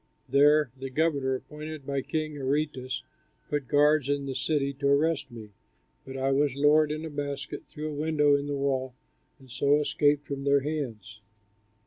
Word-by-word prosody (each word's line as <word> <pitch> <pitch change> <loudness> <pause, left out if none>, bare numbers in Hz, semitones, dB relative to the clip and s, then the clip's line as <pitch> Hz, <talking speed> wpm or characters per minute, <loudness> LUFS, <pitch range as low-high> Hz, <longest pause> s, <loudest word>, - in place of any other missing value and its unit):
There 145 -1 +4
the 135 0 -6
governor, 140 -2 +1
appointed 150 +1 -8
by 140 0 -1
King 155 +1 -3
Aretas, 135 -2 -2 0.4
put 145 -3 -2
guards 150 -1 +3
in 145 -1 0
the 135 - -3
city 140 +1 0
to 140 - +1
arrest 145 0 +2
me, 110 -4 -11 0.6
but 135 0 -6
I 135 +1 0
was 140 -1 +2
lowered 150 +2 +4
in 155 +1 -4
a - - -5
basket 140 -1 -5
through 155 +1 -6
a 145 0 -4
window 150 -2 +3
in 140 0 -2
the 145 -1 -2
wall 130 -2 -1 0.4
and 130 -3 -17
so 140 +3 +3
escaped 145 0 +2
from 140 -1 -5
their 140 0 +3
hands. 120 -8 -5
140 Hz, 170 wpm, -28 LUFS, 135-150 Hz, 0.6 s, There